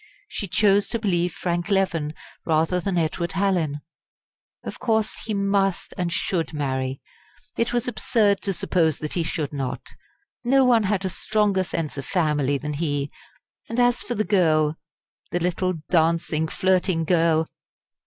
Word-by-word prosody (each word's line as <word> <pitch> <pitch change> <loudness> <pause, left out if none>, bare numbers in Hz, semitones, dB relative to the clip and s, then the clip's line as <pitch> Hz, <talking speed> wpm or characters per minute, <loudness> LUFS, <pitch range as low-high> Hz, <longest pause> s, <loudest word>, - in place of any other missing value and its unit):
She 210 - -4
chose 200 +2 +3
to - - -1
believe 180 -5 0
Frank 175 +2 -2
Leven, 170 -6 0 0.3
rather 165 +3 +1
than 185 0 -1
Edward 170 +1 -1
Hallin. 180 -7 0 0.8
Of - - -7
course 220 -2 +1
he 215 -1 -2
must 195 -1 0
and 175 -1 -2
should 165 -1 -1
marry! 130 -2 -2 0.6
It 230 +1 0
was 240 -1 0
absurd 210 -4 +2
to 200 - -1
suppose 165 -4 +1
that 150 - -4
he 175 - 0
should 155 -2 -2
not. 135 -3 -4 0.5
No 265 +2 +4
one 235 -4 +4
had 195 -1 0
a - - 0
stronger 205 -1 +1
sense 160 -5 -4
of 140 - -6
family 150 -6 +1
than 150 +2 -4
he. 145 -2 -1 0.6
And 230 +2 -2
as 245 0 +3
for 240 - -4
the 215 - +1
girl 160 -6 +3 0.5
the 175 - -1
little 180 +1 0 0.2
dancing, 160 -2 +2
flirting 185 -1 +1
girl! 165 -1 +3
175 Hz, 155 wpm, -24 LUFS, 155-200 Hz, 0.8 s, No